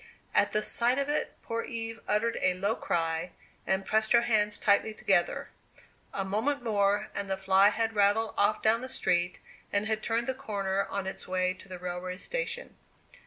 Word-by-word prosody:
At 205 Hz, -, +3 dB
the 210 Hz, +1 st, 0 dB
sight 240 Hz, +2 st, +2 dB
of 280 Hz, 0 st, 0 dB
it 295 Hz, -, -1 dB
poor 230 Hz, 0 st, -2 dB
Eve 225 Hz, -2 st, -5 dB
uttered 225 Hz, +3 st, +1 dB
a 185 Hz, -, +2 dB
low 200 Hz, +4 st, 0 dB
cry, 165 Hz, +1 st, -1 dB, 0.3 s
and 190 Hz, 0 st, +1 dB
pressed 220 Hz, +2 st, +2 dB
her 235 Hz, 0 st, +6 dB
hands 210 Hz, -3 st, +2 dB
tightly 210 Hz, +1 st, +2 dB
together. 190 Hz, -5 st, +1 dB, 0.6 s
A 195 Hz, -, -2 dB
moment 235 Hz, +8 st, 0 dB
more, 205 Hz, -3 st, +1 dB
and 200 Hz, -1 st, -4 dB
the 190 Hz, -, 0 dB
fly 190 Hz, +1 st, +5 dB
had 225 Hz, +1 st, -1 dB
rattled 205 Hz, +2 st, +2 dB
off 205 Hz, +1 st, +2 dB
down 225 Hz, +2 st, +4 dB
the 260 Hz, -, -5 dB
street, 175 Hz, -8 st, 0 dB, 0.3 s
and 205 Hz, +1 st, +1 dB
had 220 Hz, 0 st, -1 dB
turned 230 Hz, +1 st, 0 dB
the 260 Hz, -, 0 dB
corner 200 Hz, -5 st, -2 dB
on 200 Hz, -, -3 dB
its 190 Hz, -, -5 dB
way 185 Hz, 0 st, +1 dB
to 195 Hz, -, -16 dB
the 185 Hz, -, -6 dB
railway 180 Hz, +1 st, -5 dB
station. -, -, -4 dB
205 Hz, 185 wpm, -29 LUFS, 190-225 Hz, 0.6 s, her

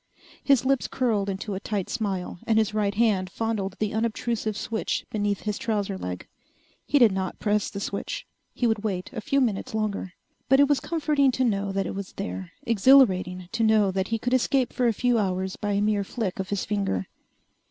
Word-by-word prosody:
His 270 Hz, -3 st, +3 dB
lips 270 Hz, -1 st, +2 dB
curled 215 Hz, -6 st, 0 dB
into 195 Hz, +2 st, -4 dB
a 190 Hz, -, -3 dB
tight 200 Hz, -2 st, -3 dB
smile 190 Hz, -5 st, -3 dB
and 220 Hz, -1 st, +3 dB
his 215 Hz, -1 st, +2 dB
right 205 Hz, -1 st, 0 dB
hand 205 Hz, -5 st, +2 dB
fondled 205 Hz, -2 st, -2 dB
the 215 Hz, -1 st, -1 dB
unobtrusive 220 Hz, -1 st, -1 dB
switch 225 Hz, 0 st, -2 dB
beneath 205 Hz, -2 st, -1 dB
his 210 Hz, -1 st, -3 dB
trouser 205 Hz, -3 st, -1 dB
leg. 90 Hz, -, -5 dB, 0.6 s
He 290 Hz, -, +3 dB
did 235 Hz, -6 st, +6 dB
not 190 Hz, -1 st, -3 dB
press 210 Hz, -1 st, 0 dB
the 200 Hz, -, -6 dB
switch. 200 Hz, 0 st, -4 dB, 0.3 s
He 245 Hz, -, -2 dB
would 220 Hz, -2 st, +1 dB
wait 190 Hz, -1 st, -3 dB
a 225 Hz, -, -4 dB
few 275 Hz, +6 st, +1 dB
minutes 240 Hz, -1 st, -1 dB
longer. 205 Hz, -4 st, -2 dB, 0.4 s
But 270 Hz, +1 st, +6 dB
it 285 Hz, -, +6 dB
was 290 Hz, -1 st, +2 dB
comforting 300 Hz, -4 st, +1 dB
to 260 Hz, -, +1 dB
know 200 Hz, -4 st, 0 dB
that 195 Hz, 0 st, 0 dB
it -, -, -4 dB
was 195 Hz, -1 st, -6 dB
there, 90 Hz, 0 st, -5 dB
exhilarating 195 Hz, -6 st, +4 dB
to 230 Hz, 0 st, -2 dB
know 215 Hz, -3 st, +4 dB
that 190 Hz, 0 st, -1 dB
he 225 Hz, -, 0 dB
could 245 Hz, +3 st, -2 dB
escape 260 Hz, 0 st, +2 dB
for 250 Hz, -, +1 dB
a 230 Hz, -, +3 dB
few 245 Hz, +1 st, +2 dB
hours 190 Hz, -1 st, -1 dB
by 205 Hz, -2 st, -2 dB
a 200 Hz, -, +1 dB
mere 210 Hz, -1 st, +1 dB
flick 200 Hz, -2 st, -4 dB
of 190 Hz, 0 st, -3 dB
his 200 Hz, -1 st, -1 dB
finger. 195 Hz, -, -1 dB
210 Hz, 205 wpm, -26 LUFS, 195-235 Hz, 0.6 s, did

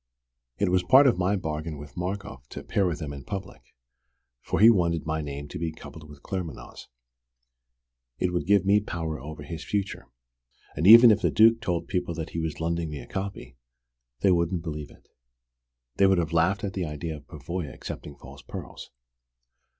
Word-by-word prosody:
It -, -, +1 dB
was 90 Hz, 0 st, +3 dB
part 130 Hz, +10 st, +6 dB
of 120 Hz, -9 st, +3 dB
my 95 Hz, +3 st, +2 dB
bargain 80 Hz, -3 st, -4 dB
with 70 Hz, 0 st, -11 dB
Markoff 90 Hz, -9 st, -5 dB
to -, -, -7 dB
appear 100 Hz, -2 st, 0 dB
with 85 Hz, -4 st, -2 dB
them 75 Hz, -4 st, -6 dB
in 70 Hz, -, -9 dB
public, 100 Hz, -9 st, -7 dB, 0.8 s
for -, -, -2 dB
he 110 Hz, -, +8 dB
wanted 85 Hz, -6 st, +1 dB
my 80 Hz, 0 st, -1 dB
name 70 Hz, -1 st, -6 dB
to -, -, -6 dB
be 85 Hz, -1 st, -2 dB
coupled 75 Hz, 0 st, -12 dB
with 75 Hz, -1 st, -14 dB
Claremanagh's. 90 Hz, -7 st, -6 dB, 1.3 s
It 90 Hz, -1 st, -1 dB
would 85 Hz, -, -2 dB
give 100 Hz, -1 st, +4 dB
me 100 Hz, +2 st, +5 dB
more 105 Hz, -, -11 dB
power 80 Hz, -5 st, -4 dB
over 75 Hz, +1 st, -8 dB
his 80 Hz, +2 st, -7 dB
future. 100 Hz, -1 st, -3 dB, 0.7 s
And 80 Hz, +5 st, +1 dB
even 115 Hz, +2 st, +10 dB
if 105 Hz, -, +2 dB
the -, -, +2 dB
Duke 115 Hz, +1 st, +5 dB
told 85 Hz, -5 st, -2 dB
people 90 Hz, -3 st, -2 dB
that 80 Hz, 0 st, -5 dB
he 85 Hz, -, -3 dB
was 80 Hz, -2 st, -3 dB
lending 85 Hz, 0 st, -1 dB
me 75 Hz, -, -6 dB
a -, -, -9 dB
copy, 95 Hz, -11 st, -6 dB, 0.6 s
they 95 Hz, -, +4 dB
wouldn't 85 Hz, 0 st, +1 dB
believe 75 Hz, -3 st, -5 dB
it. -, -, -20 dB, 0.9 s
They 100 Hz, -, +5 dB
would 95 Hz, -1 st, +4 dB
have 85 Hz, -1 st, -1 dB
laughed 90 Hz, +5 st, +2 dB
at 100 Hz, -1 st, -3 dB
the 95 Hz, -2 st, -2 dB
idea 75 Hz, +2 st, -5 dB
of -, -, -16 dB
Pavoya 85 Hz, -4 st, -5 dB
accepting 75 Hz, -, -8 dB
false 70 Hz, +2 st, -13 dB
pearls. 65 Hz, -, -9 dB
85 Hz, 190 wpm, -26 LUFS, 75-95 Hz, 1.3 s, even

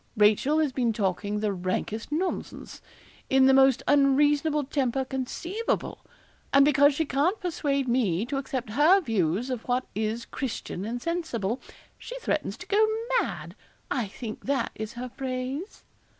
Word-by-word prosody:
Rachel 215 Hz, +8 st, +4 dB
has 310 Hz, -3 st, +2 dB
been 245 Hz, -3 st, 0 dB
talking 205 Hz, 0 st, -1 dB
the 210 Hz, -2 st, 0 dB
rankest 190 Hz, +6 st, -3 dB
nonsense, 355 Hz, +5 st, -3 dB, 0.5 s
in 265 Hz, 0 st, +5 dB
the 265 Hz, -, +6 dB
most 265 Hz, -1 st, +5 dB
unreasonable 290 Hz, +2 st, +3 dB
temper 265 Hz, -1 st, -1 dB
conceivable; 310 Hz, -, -3 dB, 0.5 s
and 275 Hz, 0 st, +6 dB
because 285 Hz, 0 st, +5 dB
she 320 Hz, -, 0 dB
can't 300 Hz, +10 st, +1 dB
persuade 285 Hz, -7 st, -1 dB
me 225 Hz, -6 st, +1 dB
to 275 Hz, +3 st, -3 dB
accept 260 Hz, -4 st, -4 dB
her 305 Hz, -, +5 dB
views 225 Hz, -, 0 dB
of 245 Hz, -3 st, -5 dB
what 250 Hz, +1 st, 0 dB
is 220 Hz, +2 st, -2 dB
Christian 225 Hz, -7 st, -5 dB
and 235 Hz, +3 st, -3 dB
sensible, 265 Hz, -, -2 dB, 0.4 s
she -, -, -7 dB
threatens 300 Hz, -, -2 dB
to -, -, -9 dB
go 420 Hz, +2 st, +4 dB, 0.4 s
mad -, -, -4 dB, 0.4 s
I 240 Hz, -6 st, 0 dB
think 215 Hz, +2 st, -8 dB
that 270 Hz, -3 st, 0 dB
is 215 Hz, 0 st, -6 dB
her 250 Hz, +1 st, -6 dB
phrase.' 260 Hz, -, -5 dB
265 Hz, 150 wpm, -27 LUFS, 225-290 Hz, 0.5 s, the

